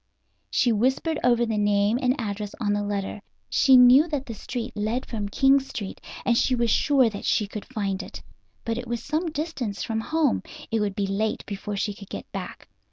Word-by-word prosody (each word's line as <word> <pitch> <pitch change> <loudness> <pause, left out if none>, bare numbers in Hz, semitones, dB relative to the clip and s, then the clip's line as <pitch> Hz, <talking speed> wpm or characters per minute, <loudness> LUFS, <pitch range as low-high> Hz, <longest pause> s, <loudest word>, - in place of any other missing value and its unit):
She 245 - +2
whispered 260 +8 +1
over 240 -1 +4
the 220 -2 -1
name 205 +2 +2
and 255 +2 +1
address 210 0 -4
on 205 -3 +1
the 205 - 0
letter. 205 0 -3 0.3
She 265 -2 +6
knew 250 +5 +7
that 290 -4 -3
the 230 - -6
street 240 +3 -5
led 220 +4 -1
from 210 -3 -4
King 270 +5 +4
Street, 225 -7 -7 0.2
and 240 - +3
she 255 +2 +2
was 235 -2 +1
sure 275 -4 +4
that 205 -3 -5
she 210 - +2
could 205 +1 -7
find 200 -6 -2
it. - - -10 0.4
But 230 +1 -1
it 245 - -7
was 235 0 -3
some 315 +4 -1
distance 285 - -3
from 225 -1 -2
home; 310 0 +1 0.3
it 225 - +1
would 205 -2 -1
be 200 - 0
late 205 +3 -1
before 205 0 -5
she 205 +1 -1
could 200 0 -12
get - - -6
back. 190 -3 -7
225 Hz, 205 wpm, -25 LUFS, 205-255 Hz, 0.4 s, knew